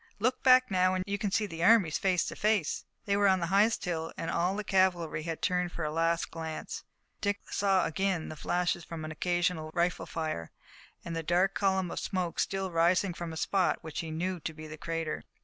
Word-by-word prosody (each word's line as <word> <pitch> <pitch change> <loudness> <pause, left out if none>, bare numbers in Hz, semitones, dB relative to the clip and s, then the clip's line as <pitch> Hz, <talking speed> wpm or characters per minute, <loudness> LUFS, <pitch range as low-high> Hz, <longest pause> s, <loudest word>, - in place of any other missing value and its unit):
Look 250 +5 0
back 255 -2 +6
now, 185 0 +3
and 185 - -1
you 200 0 -2
can 205 - 0
see 210 +2 +1
the 165 -4 -5
armies 185 -6 +5
face 185 -3 +2
to - - -5
face." 210 -6 +1 0.2
They 200 - +1
were 200 0 +4
on 190 -1 +4
the 170 - -1
highest 210 +3 +3
hill, 165 -2 -2
and 165 - -3
all 180 +3 +1
the 210 - -3
cavalry 180 -6 +1
had 165 0 -5
turned 180 -1 +1
for 170 - -4
a 150 - -1
last 165 +1 0
glance. 160 -1 -5 0.4
Dick 205 0 0
saw 195 -2 +2
again 180 +1 -1
the 155 - -7
flashes 175 +2 -1
from 160 -1 -6
occasional 175 0 -1
rifle 175 0 0
fire, 155 - -3 0.6
and 170 - -4
a 165 - -1
dark 180 +4 +2
column 190 -3 +1
of - - -3
smoke 180 -4 -2
still 195 -1 -1
rising 175 +3 +3
from 170 -1 -5
a 160 - -6
spot 190 +2 +1
which 160 -2 -5
he 165 - -4
knew 175 +3 -2
to 160 0 -5
be 155 0 -9
the 155 0 -7
crater. 165 0 -3
175 Hz, 215 wpm, -30 LUFS, 165-195 Hz, 0.6 s, back